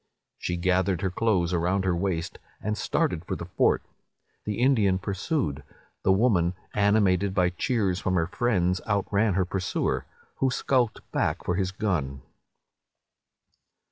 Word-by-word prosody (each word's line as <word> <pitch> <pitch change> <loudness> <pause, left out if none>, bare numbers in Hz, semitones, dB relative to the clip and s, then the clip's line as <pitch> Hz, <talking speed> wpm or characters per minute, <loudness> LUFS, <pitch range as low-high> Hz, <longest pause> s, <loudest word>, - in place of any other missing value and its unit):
She 90 - -2
gathered 95 0 +1
her 95 - 0
clothes 95 -4 +1
around 90 +3 +1
her 90 -2 +2
waist, 85 -2 -2 0.2
and 105 +1 -2
started - - 0
for - - -3
the - - -6
fort. - - +2 0.6
The 105 - -2
Indian 115 -7 +3
pursued: 100 - -2 0.4
the 95 - +3
woman, 95 -4 +3 0.2
animated 100 -2 +2
by 90 -2 +3
cheers 95 -1 0
from 95 -1 -1
her 85 -2 +2
friends, 90 -3 0
out 100 -2 +1
ran 100 -1 +3
her 95 -1 +2
pursuer, 95 0 -2 0.3
who 135 - +2
skulked 125 -3 0
back - - -1
for 90 - +1
his 95 0 -1
gun. 80 - -2
95 Hz, 140 wpm, -26 LUFS, 90-105 Hz, 0.6 s, Indian